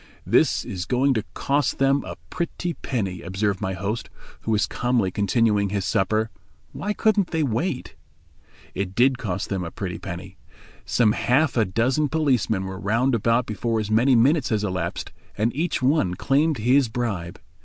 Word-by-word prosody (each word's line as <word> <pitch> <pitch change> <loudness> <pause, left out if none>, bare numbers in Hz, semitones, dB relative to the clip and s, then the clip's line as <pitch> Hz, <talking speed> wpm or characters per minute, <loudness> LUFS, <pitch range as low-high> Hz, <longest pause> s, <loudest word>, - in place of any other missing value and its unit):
"This - - +3
is 95 -1 -4
going 135 +2 +2
to 110 -4 -1
cost 145 +1 0
them 135 +1 +2
a - - -6 0.2
pretty 175 0 -3
penny," 100 - -3
observed 95 +1 -1
my 95 -2 -1
host, 100 +5 -3 0.3
who - - -7
was 110 -2 +3
calmly 120 -6 0
continuing 105 0 +2
his 100 -1 -2
supper; 110 +4 +1 0.4
"why 205 - -3
couldn't 210 -3 +2
they 160 -2 0
wait?" 125 - -2 0.8
It 95 0 -3
did 130 +2 +3
cost 95 -5 -3
them 95 -2 -2
a 85 - -4
pretty 90 -1 -5
penny. 95 +1 -7 0.5
Some 115 -4 +3
half 130 +7 +2
a 115 -3 +3
dozen 125 +10 +1
policemen 130 -10 +1
were 95 0 -6
round 115 +6 +1
about 115 +2 +2
before 110 +2 -1
as 105 0 -3
many 120 +4 +4
minutes 135 +5 +3
had 105 -2 0
elapsed, 90 -4 -3 0.3
and 110 +4 0
each 160 -3 -1
one 125 - +2
claimed 145 - +2
his 125 +3 +3
bribe. 100 -8 -3
115 Hz, 165 wpm, -24 LUFS, 100-135 Hz, 0.8 s, many